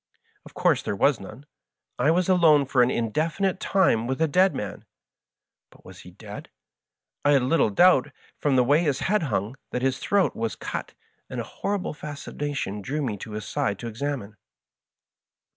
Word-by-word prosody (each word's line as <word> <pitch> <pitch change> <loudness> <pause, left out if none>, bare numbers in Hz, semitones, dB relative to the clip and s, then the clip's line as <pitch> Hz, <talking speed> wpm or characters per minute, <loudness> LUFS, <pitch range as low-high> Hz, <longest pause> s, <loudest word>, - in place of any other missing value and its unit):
Of - - -17
course - - +2
there - - -3
was 135 +5 +3
none. 110 +8 -11 0.5
I 145 - +3
was 175 +2 +2
alone 165 -6 +5
for 130 -1 +2
an 120 - +4
indefinite 160 - -1
time 145 - +2
with 130 +2 -2
a 160 - +3
dead 185 +6 +3
man. 105 - -5 0.9
But - - -22
was - - -12
he - - -12
dead? - - -10 0.7
I 145 - +4
had 135 -3 +4
little 130 -2 +3
doubt, 145 - +4 0.3
from 145 -3 +1
the 125 - +5
way 145 +6 +3
his 145 -5 0
head 210 +3 +1
hung, 115 - -2
that 125 - -3
his 135 0 0
throat 200 -2 +1
was 115 -1 -3 0.2
«ut, - - -5 0.3
and - - -5
a - - -2
hor 205 - -3
rible 180 -5 -5
fascination 145 -7 -5
drew 145 +8 -3
me 115 -6 -2
to 105 +2 -8
his 105 -1 -5
side 100 - -1
to 120 - -6
examine. 115 -3 -4
140 Hz, 180 wpm, -25 LUFS, 115-160 Hz, 0.9 s, alone